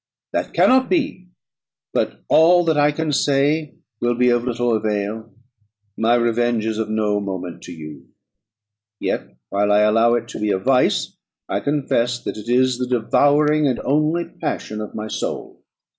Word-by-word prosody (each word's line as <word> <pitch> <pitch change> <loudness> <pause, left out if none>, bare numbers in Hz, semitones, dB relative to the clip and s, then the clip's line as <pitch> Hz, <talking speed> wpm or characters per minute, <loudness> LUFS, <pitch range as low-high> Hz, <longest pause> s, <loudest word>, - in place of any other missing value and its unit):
"That - - -3
cannot 260 0 +4
be; 285 - -1 0.7
but - - -2
all 175 +2 +5
that 160 -1 +2
I 145 0 +3
can 155 +1 -2
say 145 +2 +1 0.2
will 120 0 0
be 125 +1 +3
of 120 0 +2
little 120 -1 0
avail. 110 +1 -3 0.6
My 115 +2 +2
revenge 120 -1 +1
is 110 -1 -2
of 110 - -2
no 105 -1 0
moment 95 -3 -6
to - - -9
you; 75 -5 -10 0.9
yet, - - -3
while 100 +1 +1
I 105 +1 +4
allow 115 +3 +4
it 120 - -3
to - - -7
be 105 0 -1
a 100 - +2
vice, 125 +6 +1 0.3
I - - -1
confess 130 -4 0
that - - -4
it 105 +2 -8
is 125 0 +2
the 125 - -2
devouring 145 +5 +2
and 130 - -1
only 155 +4 +1
passion 110 -9 -5
of 105 - -8
my 110 0 -4
soul. - - -5
120 Hz, 165 wpm, -20 LUFS, 110-145 Hz, 0.9 s, all